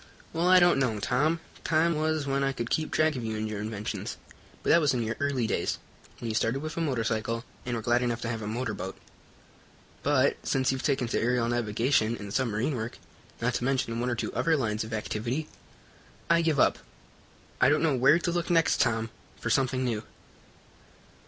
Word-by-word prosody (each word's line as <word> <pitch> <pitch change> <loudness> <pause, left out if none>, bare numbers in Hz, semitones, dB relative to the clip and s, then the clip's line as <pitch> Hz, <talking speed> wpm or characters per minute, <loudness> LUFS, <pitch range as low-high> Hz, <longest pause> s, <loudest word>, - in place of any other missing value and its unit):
"Well, 170 +2 +1
I 185 0 +8
don't 175 -5 +5
know, 125 -5 +1
Tom. 150 +10 +1 0.2
Time 165 +1 +3
was 155 -1 0
when 140 0 0
I 135 0 +1
could 120 -2 -4
keep 155 -1 0
track 155 -1 +2
of 125 - -4
you 110 -1 -3
and 110 0 -2
your 105 -1 -4
inventions, 105 0 -4 0.5
but - - +2
that 170 - +6
was 145 -4 +2
in 120 - 0
your 110 +1 -2
early 140 -4 0
days, - - -1 0.4
when 120 - -6
you 110 - -2
started 115 +6 0
with 155 0 -5
a 170 - -2
motorcycle 115 -4 -1 0.2
and 120 - -1
were 115 - -4
glad 120 +1 +2
enough 120 -1 -1
to 115 - -3
have 115 -1 -3
a 105 - -4
motorboat. 110 -4 -3 1.0
But, 140 -1 +2
since 130 -1 +1
you've 130 -1 -2
taken 140 -4 +1
to - - 0
aerial 120 0 +1
navigation 115 0 +1
and 100 -1 -7
submarine 125 +2 0
work, 110 0 -4 0.5
not 125 +1 +1
to 120 - -2
mention 125 -3 0
one 125 +1 0
or 120 - 0
two 120 - -3
other 165 -1 +2
lines 110 -5 -1
of 110 - -8
activity, 115 +7 -2 0.8
I 170 0 +5
give 160 -4 +1
up. - - +4 0.8
I - - +6
don't 150 +2 +3
know 155 -4 +3
where 135 +5 +5
to 175 0 -1
look 175 0 -1
next, 165 -2 +3
Tom, 115 -2 +1 0.3
for 120 - -2
something 130 +1 +1
new." 115 -3 -1
125 Hz, 205 wpm, -28 LUFS, 115-145 Hz, 1.0 s, I